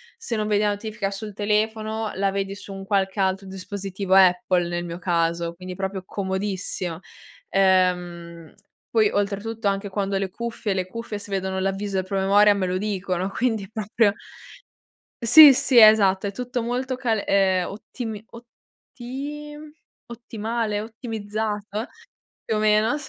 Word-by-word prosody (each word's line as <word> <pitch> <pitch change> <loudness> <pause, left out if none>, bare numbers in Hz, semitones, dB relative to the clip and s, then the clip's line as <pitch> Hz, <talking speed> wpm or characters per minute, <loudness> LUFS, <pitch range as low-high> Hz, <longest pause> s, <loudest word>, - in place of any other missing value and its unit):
se 350 - -4
non 215 0 -1
vedi 210 -1 +2
la 210 - +3
notifica 205 -1 -3
sul 210 +1 -6
telefono, 215 +1 -1
la 195 0 +1
vedi 195 0 -3
su 200 0 -11
un 195 0 -8
qualche 195 0 0
altro 190 0 0
dispositivo 195 0 -4
Apple, 180 -2 +4
nel 175 0 -3
mio 170 0 -6
caso, 170 -1 0
quindi 185 +1 -8
proprio 190 0 -4
comodissimo. 190 -3 -3 0.5
Ehm, 180 -3 +1 0.4
poi 220 -3 +3
oltretutto 205 +2 -2
anche 200 +1 -1
quando 195 0 -2
ho - - +1
le 195 -1 -2
cuffie, 230 0 -4
le 185 -1 -1
cuffie 225 +1 -6
si 205 0 -10
vedono 190 -1 -2
l'avviso 195 +1 -2
del 190 -1 0
promemoria 200 +2 +4
me 195 -2 -1
lo 180 0 -1
dicono 190 -2 -2
quindi 220 -3 -1
proprio 215 0 +1 1.1
Sì, 295 +4 +10
sì 255 -1 +4
esatto 205 -3 +6
è - - -3
tutto 245 +1 -3
molto 250 +2 -2
cal 225 -5 0
ehm, 190 -2 +2
ottimi 220 +1 -7
otti 265 +5 -9 0.5
ottimale, 225 -2 -3
ottimizzato 215 -1 -4 0.6
più 220 - -1
o - - +1
meno 215 +3 +3
200 Hz, 145 wpm, -23 LUFS, 190-220 Hz, 1.1 s, Sì